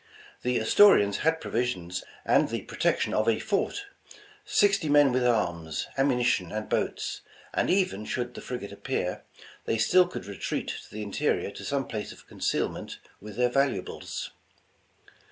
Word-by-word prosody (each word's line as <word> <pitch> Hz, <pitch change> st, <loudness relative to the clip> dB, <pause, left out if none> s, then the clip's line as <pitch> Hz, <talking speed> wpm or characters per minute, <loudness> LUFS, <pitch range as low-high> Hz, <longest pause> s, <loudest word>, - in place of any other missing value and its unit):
The 125 Hz, 0 st, +1 dB
Astori 195 Hz, -, +6 dB
ans 100 Hz, 0 st, -2 dB
had 160 Hz, +1 st, +1 dB
provisions 95 Hz, -, -2 dB, 0.2 s
and -, -, +4 dB
the -, -, -3 dB
protection -, -, 0 dB
of 110 Hz, +1 st, +2 dB
a 110 Hz, -, +3 dB
fort; 220 Hz, -, -1 dB, 0.6 s
sixty 200 Hz, -6 st, +2 dB
men 145 Hz, -2 st, +6 dB
with 125 Hz, 0 st, +1 dB
arms, 85 Hz, -10 st, 0 dB
ammunition 125 Hz, -10 st, +2 dB
and 110 Hz, 0 st, -4 dB
boats; -, -, -2 dB, 0.3 s
and -, -, +1 dB
even 180 Hz, -, +1 dB
should 125 Hz, +1 st, -3 dB
the -, -, -8 dB
frigate 120 Hz, -6 st, -6 dB
appear, 100 Hz, 0 st, -3 dB, 0.4 s
they 115 Hz, -, 0 dB
still 180 Hz, +11 st, +5 dB
could 180 Hz, -, -7 dB
retreat 100 Hz, -1 st, -3 dB, 0.2 s
to -, -, -18 dB
the 105 Hz, 0 st, -5 dB
in 100 Hz, -, -7 dB
terior 145 Hz, -6 st, 0 dB
to -, -, -9 dB
some 140 Hz, -1 st, -1 dB
place 105 Hz, -1 st, -4 dB
of -, -, -14 dB
concealment -, -, -2 dB, 0.2 s
with 105 Hz, 0 st, -10 dB
their 125 Hz, +1 st, +2 dB
valuables. 135 Hz, +1 st, -2 dB
120 Hz, 155 wpm, -28 LUFS, 100-145 Hz, 0.6 s, Astori